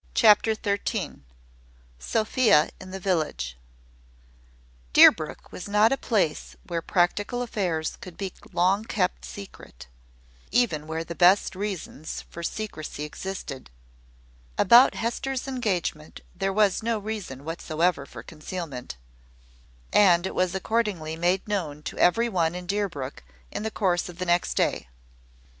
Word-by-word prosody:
CHAPTER 220 0 +5
THIRTEEN. 200 - -3 0.7
SOPHIA 215 - +3
IN 185 - -10
THE 190 +1 -6
VILLAGE. 155 - -1 1.4
Deerbrook - - +5
was 180 - -7
not 210 +2 +4
a - - +4
place 200 - -1
where 170 -2 -2
practical 205 +8 0
affairs 180 -9 -2
could 180 -2 -10
be 195 -2 -4 0.2
long 190 +4 +2
kept 190 -5 -1
secret, 195 - -10 0.7
even 160 -12 +1
where 160 +1 -3
the 170 - -6
best 185 +3 +4
reasons 190 -6 -5
for 170 - -7
secrecy 165 -6 -5
existed. 150 - -6 0.9
About 240 +6 +7
Hester's 260 +3 -2
engagement 190 - -2
there 195 0 -1
was 205 0 +2
no 230 0 0
reason 200 -11 -6
whatever 165 -2 -1
for 120 -3 -10
concealment; 155 - -7 1.0
and 180 -4 +5
it - - -3
was 185 0 0
accordingly 190 -6 -1
made 175 +4 0
known 160 -8 -3
to - - -6
every 230 +7 +4
one 175 -6 0
in 180 0 -6
Deerbrook 175 -9 -3 0.3
in - - -4
the 220 - -2
course 185 -5 0
of 175 - -10
the 185 - -3
next 175 0 +1
day. - - 0
185 Hz, 130 wpm, -26 LUFS, 165-210 Hz, 1.4 s, About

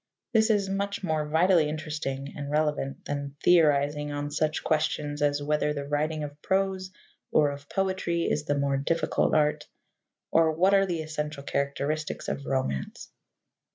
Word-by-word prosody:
This 220 0 +4
is 205 -3 +2
much 200 +1 -2
more 155 -3 0
vitally 165 0 +4
interesting 150 -3 -4
and 140 -1 -5
relevant 150 -2 -1
than 140 -1 -4
theorizing 150 -3 +3
on 145 0 -3
such 155 +1 0
questions 150 -1 0
as 145 0 +1
whether 150 0 +1
the 140 -1 -4
writing 150 +1 -1
of 145 0 -8
prose 190 -1 0 0.4
or 150 -2 +4
of 140 0 -10
poetry 185 -3 0
is 150 -2 0
the 145 -1 0
more 140 -1 +1
difficult 155 +4 +1
art, 150 -1 +2 0.6
or 160 -1 +4
what 185 +5 +3
are 195 0 +4
the 170 -3 -2
essential 150 -2 -4
characteristics 140 +2 -2
of 140 - -4
romance. 130 - -2
150 Hz, 155 wpm, -27 LUFS, 145-165 Hz, 0.6 s, This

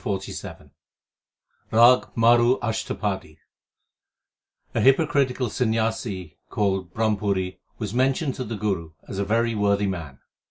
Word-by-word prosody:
RAG 120 +3 +6
MARU 120 +2 +5
ASHTAPADI 100 -7 -3 1.4
A - - 0
hypocritical 135 -2 +3
Sanyasi 110 - -2
called 95 -3 -1
Brahmpuri 100 -3 -1 0.2
was 105 -3 -4
mentioned 135 +3 +1
to 130 - -4
the 115 -1 -5
Guru 95 -6 -2
as 95 - -5
a 100 - 0
very 115 +3 +1
worthy 100 -1 +1
man. 80 -8 -4
110 Hz, 105 wpm, -24 LUFS, 95-120 Hz, 1.4 s, RAG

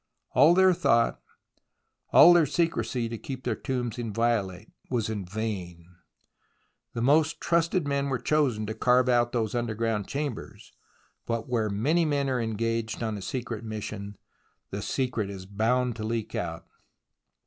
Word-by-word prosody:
All 150 +6 +6
their 190 0 +6
thought, 115 -9 +2 0.9
all 175 - +9
their 170 -3 +4
secrecy 125 -8 -1
to 115 -1 -6
keep 130 -1 -7
their - - 0
tombs 125 -3 -3
inviolate, 110 -4 -1 0.2
was 115 -4 -1
in 105 -3 -4
vain. 90 -4 -5 1.0
The 115 - -2
most 155 +4 +3
trusted 170 -1 +1
men 140 0 0
were 130 - 0
chosen 130 -8 +1
to 110 - -4
carve 125 +2 +3
out 120 -1 +3
these 110 -3 -1
underground 115 -3 -1
chambers, 140 -5 -5 0.6
but 115 -1 -2
where 115 -4 0
many 145 +13 +1
men 140 -3 0
are 125 -2 0
engaged 115 0 -2
on 110 -1 -2
a 100 - -6
secret 120 +1 -4
mission, 105 -2 -6 0.5
the - - -4
secret 125 -6 -2
is 95 -2 -8
bound 115 +5 0
to 110 - -5
leak 110 -1 -3
out. 80 -1 -4
115 Hz, 150 wpm, -27 LUFS, 110-130 Hz, 1.0 s, all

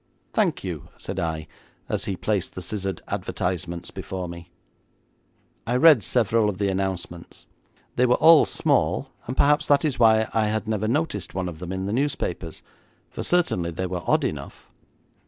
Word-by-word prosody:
'Thank - - +1
you,' - - -5
said - - -5
I, 80 -3 -2 0.4
as - - -1
he 95 - -2
placed 100 0 -2
the 95 - -5
scissored 95 -1 -3
advertisements 90 -1 -3
before 95 -1 -5
me. 85 0 -9 1.2
I 120 - 0
read 150 -2 +7
several 115 0 +2
of 100 - -4
the 100 0 0
announcements. 95 -3 -4 0.5
They 125 - +4
were 125 - +4
all 160 -1 +7
small, - - +1 0.2
and 125 - -4
perhaps 150 +1 +3
that 145 +2 +4
is 145 -5 -1
why 110 -1 +5
I 110 -1 +2
had 110 +1 -2
never 110 -1 -1
noticed 125 - -1
one 95 -1 -1
of 85 -3 -7
them 90 0 -6
in 95 0 -3
the 100 - -2
newspapers, 115 - -2 0.5
for - - -6
certainly 165 - +1
they 90 +3 -3
were 90 -1 -3
odd - - +3
enough. - - -5
100 Hz, 170 wpm, -24 LUFS, 90-120 Hz, 1.2 s, read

